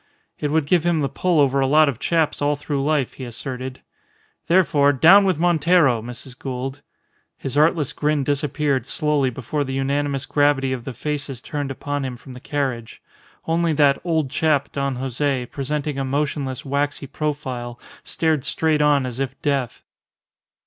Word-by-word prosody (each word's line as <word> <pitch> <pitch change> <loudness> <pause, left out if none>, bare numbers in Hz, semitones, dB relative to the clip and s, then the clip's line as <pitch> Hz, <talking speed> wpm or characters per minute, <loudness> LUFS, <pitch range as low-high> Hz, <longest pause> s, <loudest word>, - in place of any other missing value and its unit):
It 150 - -1
would 160 -1 +2
give 170 +2 +2
him 170 -2 +1
the 140 - +1
pull 180 -4 +1
over 140 -1 +3
a 135 - +2
lot 155 +2 +5
of 130 -5 -2
chaps 160 -2 0
all 145 +1 +2
through 145 -1 -3
life, 145 -3 0
he 130 - -9
asserted. 130 +1 -6 0.7
"Therefore 150 -5 +4
down 185 +9 +7
with 185 -5 +1
Montero! 165 -6 +3
Mrs. 125 +2 -9
Gould." 135 +1 -5 0.6
His 135 - -5
artless 150 -1 +2
grin 150 -1 0
disappeared 140 -2 0
slowly 150 -4 +1
before 130 +4 -3
the 135 -1 -4
unanimous 140 0 -1
gravity 145 -2 +2
of 125 -2 -6
the 130 - -6
faces 145 -2 -3
turned 145 +2 -4
upon 145 +1 -3
him 130 -2 -4
from 130 +1 -12
the 125 - -10
carriage; 130 -5 -3 0.5
only 165 0 +1
that 145 -2 +3
"old 160 -6 0
chap," 145 -1 +1
Don 140 -1 -2
Jose, 130 +1 -1
presenting 145 0 -3
a - - 0
motionless, 140 -1 -2
waxy 140 +1 -1
profile, 130 -4 -4 0.2
stared 160 -4 0
straight 155 -2 +1
on 145 -2 +3
as 125 0 -5
if 135 -1 -3
deaf. 140 -5 -1
140 Hz, 165 wpm, -22 LUFS, 130-150 Hz, 0.7 s, down